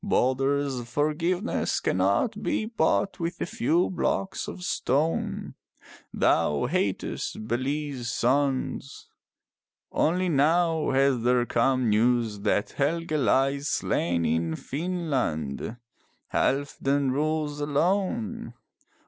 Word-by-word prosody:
Balder's 135 -5 +1
forgiveness 160 +7 0
cannot 100 - +1
be 215 - -1
bought 195 -3 0
with 170 0 -3
a - - -1
few 170 +3 +1
blocks 190 +1 -1
of 180 - -7
stone. 155 -1 -1 0.6
Thou 75 -2 +2
hatest 110 - -2
Bele's 130 +1 -2
sons. 135 +2 -1 0.8
Only 180 +3 +1
now 165 +1 +2
has 135 -2 +2
there 120 +1 +3
come 130 +1 +1
news 115 -1 +2
that 100 +1 0
Helge 165 +4 -1
lies 140 -1 +2
slain 85 - 0
in 80 +1 0
Finnland. 130 - -3 0.6
Halfdan 140 0 +1
rules 150 +1 -1
alone. 150 - -1
140 Hz, 95 wpm, -26 LUFS, 120-160 Hz, 0.8 s, there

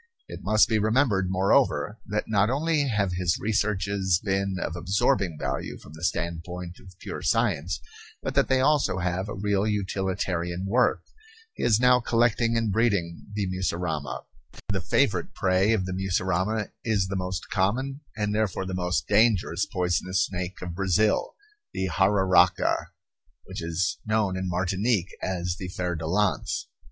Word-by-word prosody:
It - - -8
must 110 0 +4
be 110 - +1
remembered, 110 -3 +2
moreover, 95 +3 +2
that 105 +1 -1
not 105 -1 +2
only 150 +2 +1
have 105 -6 0
his 90 -1 0
researches 100 -3 +1
been 95 -1 0
of 80 - -3
absorbing 90 -1 +1
value 65 0 -3
from 75 - -14
the 80 +2 -11
standpoint 85 0 -3
of 90 -1 -15
pure - - -7
science 80 +5 0 0.4
but - - -2
that - - +3
they 130 0 +3
also 145 -7 +2
have 90 +2 -2
a - - -4
real 100 +1 0
utilitarian 95 -3 -2
worth. 120 +6 +2 0.5
He - - -8
is 110 -2 +3
now 125 0 +5
collecting 115 -1 +2
and 115 -2 0
breeding 100 -6 0
the 105 -2 0
mussurama. 90 -5 -2 0.5
The - - 0
favorite - - +1
prey 95 +3 +2
of 105 -5 +1
the 95 - -3
mussurama 95 +3 -1
is 105 -5 +1
the 100 - -4
most 90 -1 -4
common 130 +9 0 0.2
and 105 -1 -1
therefore 105 -3 0
the 95 - -4
most 90 -5 -1
dangerous 105 -4 +3
poisonous 90 0 0
snake 90 0 -5
of 90 -2 -5
Brazil, 95 +3 +1 0.4
the 95 0 -1
jararaca, 95 -2 +3 0.6
which - - -7
is 85 +3 -1
known 110 -3 +1
in 95 0 -2
Martinique 95 +2 0
as 90 -1 -2
the 95 - -5
fer 90 -1 -3
de 80 -1 -4
lance. 95 -4 0
95 Hz, 155 wpm, -26 LUFS, 90-105 Hz, 0.6 s, now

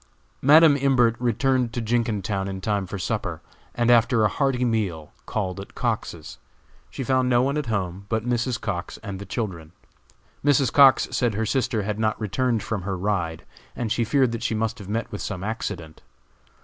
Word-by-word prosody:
Madam 150 +2 +7
Imbert 130 -4 +3
returned 125 +1 +1
to 120 - -2
Jenkintown 110 -4 -1
in 95 -1 -5
time 100 0 -1
for 100 - -5
supper, 90 - -3 0.4
and, 120 0 +3
after 115 -1 +4
a 105 - +4
hearty 130 +1 0
meal, 95 -10 -2 0.2
called 95 -3 -2
at 100 - -10
Cox's. - - -3 0.5
She 135 - -5
found 130 0 +1
no 120 0 +4
one 140 +2 0
at 150 -3 -2
home 100 -3 -3
but 110 0 -1
Mrs. 120 0 0
Cox 85 0 -4
and 100 -3 -6
the 100 - -8
children. 90 -8 -4 0.7
Mrs. 140 -3 +3
Cox 140 -2 +6
said 120 -4 0
her 110 +2 0
sister 110 -2 0
had 105 +1 -3
not 110 -1 0
returned 115 +2 0
from 110 -3 -3
her 95 +1 -3
ride, 90 -4 -2 0.3
and 115 -3 -3
she 120 - +1
feared 130 +2 +2
that 115 -1 -4
she 115 - -1
must 115 +2 -2
have 100 -2 -9
met 115 +2 -2
with 105 - -5
some 95 -2 -4
accident. 85 -7 -5
110 Hz, 185 wpm, -24 LUFS, 100-125 Hz, 0.7 s, Madam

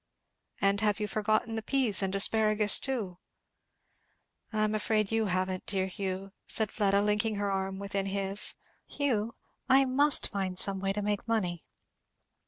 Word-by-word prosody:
"And 200 +1 +1
have 210 -1 +1
you 210 - -2
forgotten 215 +2 -1
the 220 - -3
peas 230 -5 +1
and 190 -1 -1
the 195 - -1
asparagus 215 0 +3
too?" 215 -10 -4 1.3
"I 215 -1 0
am 215 0 0
afraid 215 -1 0
you 225 -1 +1
haven't, 185 0 -2
dear 190 -2 0
Hugh," 190 0 -5 0.2
said 220 -2 0
Fleda, 200 -1 +1
linking 210 +1 0
her 200 0 -2
arm 190 0 -3
within 200 0 -3
his. 195 +1 +2 0.3
"Hugh, 230 -6 -2 0.3
I 270 +1 +5
must 280 +2 +3
find 190 -2 -3
some 195 +1 +4
way 195 0 -1
to 205 +1 -3
make 205 +2 -2
money." 180 -7 -2
205 Hz, 160 wpm, -29 LUFS, 195-220 Hz, 1.3 s, I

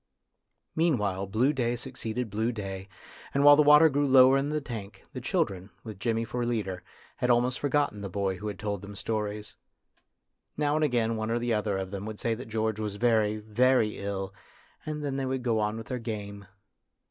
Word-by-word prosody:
Meanwhile 105 - +1
blue 120 +9 +2
day 120 -3 0
succeeded 115 -1 -4
blue 110 +3 0
day, 95 -3 -6 0.5
and 140 - +3
while 145 0 +9
the 150 - +5
water 150 +2 +8
grew 145 -1 +1
lower 130 0 +7
in 135 +1 +1
the 150 0 0
tank, 115 -7 -8
the 130 - -5
children, 115 - -1
with 110 -4 -8
Jimmy 115 +1 0
for 120 +2 -3
leader, 105 -6 -2 0.4
had 125 - 0
almost 125 +2 +2
forgotten 145 -7 0
the 100 - -5
boy 95 0 -1
who 105 - -6
had 100 -2 -4
told 100 -2 -3
them 100 0 -9
stories. 105 0 -4 1.0
Now 145 0 +1
and 155 +1 +1
again 115 -5 +1
one 110 0 -2
or 115 - +1 0.2
other 105 -2 0
of 95 -1 -4
them 100 +1 -5
would 110 -1 -7
say 115 - 0
that 115 +1 -7
George 110 -1 -1
was 105 -2 -3
very, 110 -2 +2
very 110 +1 +2
ill, 95 -1 -4 0.5
and 150 -1 -3
then 135 -1 -2
they 135 - -1
would 130 -1 -2
go 115 -3 +1
on 105 +1 -1
with 115 - -7
their 125 0 -4
game. 100 -3 -6
110 Hz, 195 wpm, -28 LUFS, 105-130 Hz, 1.0 s, while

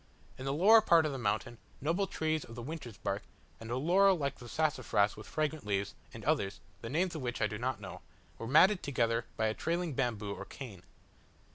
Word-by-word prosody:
In 130 - -8
the 135 - 0
lower 205 +10 +7
part 170 -6 +5
of 150 - 0
the 135 - -4
mountain, 110 +1 -1 0.2
noble 170 +7 0
trees 155 -3 -1
of 115 - -11
the 120 - -6
Winter's 130 - -7
Bark, - - -2 0.4
and 115 - -9
a 120 - -1
laurel 185 +7 +5
like 140 -3 -2
the 120 -1 -10
sassafras 130 -10 +1
with 110 - -10
fragrant 155 0 -1
leaves, 100 -1 -1 0.2
and - - -10
others, 100 0 0 0.2
the 115 - -5
names 170 +6 +1
of 155 - -5
which 120 -1 -3
I 105 - +3
do 105 0 -3
not 125 -2 -1
know, 95 -2 -8 0.4
were 115 - -5
matted 180 - +6
together 115 -4 0
by 110 - +1
a 110 - +1
trailing 170 +4 -1
bamboo 110 -6 -1
or - - -7
cane. 110 -10 -9
130 Hz, 215 wpm, -32 LUFS, 115-160 Hz, 0.4 s, lower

